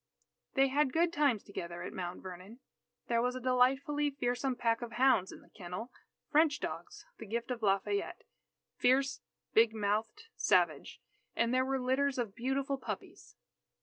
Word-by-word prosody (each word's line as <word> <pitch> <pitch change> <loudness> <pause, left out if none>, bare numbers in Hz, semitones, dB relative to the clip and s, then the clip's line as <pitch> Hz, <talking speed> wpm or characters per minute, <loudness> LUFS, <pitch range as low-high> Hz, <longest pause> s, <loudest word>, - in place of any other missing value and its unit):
They 270 0 +4
had 280 0 +2
good 335 +1 +2
times 280 -8 +2
together 175 -3 -6
at - - -6
Mount 180 -1 -5
Vernon. 185 +5 -9 0.5
There 235 -1 +2
was 250 +1 0
a - - -3
delightfully 265 +4 +2
fearsome 260 -1 -1
pack 230 -1 +1
of 235 -1 -6
hounds 240 -6 +3
in - - -12
the - - -22
kennel; 185 +5 -7 0.4
French 300 -1 +4
dogs, - - -6
the 225 - -8
gift 235 +4 -3
of 240 -2 -3
Lafayette, 200 - 0 0.5
"fierce, 270 +2 +2 0.3
big 225 0 +5
mouthed, 215 - -1
savage." - - +1 0.3
And 230 +1 +1
there 255 0 +3
were 270 0 0
litters 260 +2 +1
of 230 -5 -2
beautiful 270 +4 -1
puppies. - - -7
250 Hz, 155 wpm, -33 LUFS, 220-270 Hz, 0.5 s, big